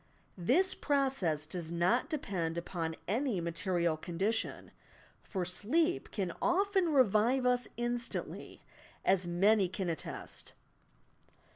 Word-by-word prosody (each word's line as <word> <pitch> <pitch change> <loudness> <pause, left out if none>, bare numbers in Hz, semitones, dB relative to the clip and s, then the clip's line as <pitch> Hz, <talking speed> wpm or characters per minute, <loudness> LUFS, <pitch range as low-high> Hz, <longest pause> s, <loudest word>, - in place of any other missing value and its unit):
This 370 - +3
process 265 - +1
does 165 0 -4
not 180 - +2
depend 185 - -2
upon 165 -2 -3
any 230 +1 0
material 170 0 0
condition, 190 +7 -2 0.3
— - - -28
for 185 -4 -1
sleep 315 - 0
can 190 -5 -3
often 380 0 +2
revive 250 0 +3
us 250 -1 +3
in 240 0 0
stantly, 235 - -5 0.4
as 185 -2 +3
many 195 +3 +3
can 185 -1 -3
attest. 160 - -5
200 Hz, 115 wpm, -33 LUFS, 175-260 Hz, 0.4 s, This